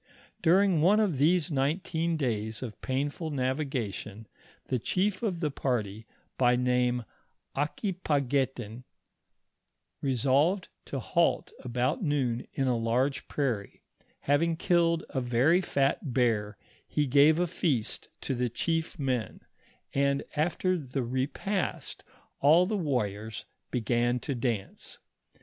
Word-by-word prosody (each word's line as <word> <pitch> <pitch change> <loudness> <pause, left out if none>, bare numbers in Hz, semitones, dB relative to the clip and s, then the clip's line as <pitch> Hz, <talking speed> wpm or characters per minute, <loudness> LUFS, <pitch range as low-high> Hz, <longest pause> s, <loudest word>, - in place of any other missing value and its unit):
During 180 -1 +4
one 200 +6 +5
of 190 -11 +1
these 170 +3 +3
nineteen 160 +4 0
days 110 -4 -2
of 115 -4 -7
painful 145 +5 -2
navigation, 130 -6 -3 0.4
the 130 - -1
chief 190 - 0
of 190 -7 -2
the 150 -3 0
party 110 -5 -2 0.3
by 125 -1 +5
name 125 -1 +1 0.5
Aquipaguetin, 140 - -1 1.2
resolved 140 - +2 0.2
to 140 - -4
halt 170 +6 +1
about 125 +3 -1
noon 135 - 0
in 135 - 0
a 125 - +2
large 120 +4 0
prairie; 120 -9 -2 0.4
having 160 +4 +2
killed 170 -1 +2
a 130 - -1
very 125 +9 +3
fat 140 -4 0
bear, 110 -5 +1 0.3
he 150 - 0
gave 145 +4 +5
a 175 - +2
feast 150 -9 -1
to - - -2
tne 125 -1 0
chief 165 +8 -1
men, 130 -6 -2 0.5
and 140 0 +1
after 175 +4 +1
the 135 -2 -3
repast 135 - -2 0.4
all 160 +6 +6
the 215 +3 -1
warriors 110 - -2 0.2
began 120 +1 +1
to 140 - -2
dance. 115 -5 -3
135 Hz, 120 wpm, -29 LUFS, 120-160 Hz, 1.2 s, all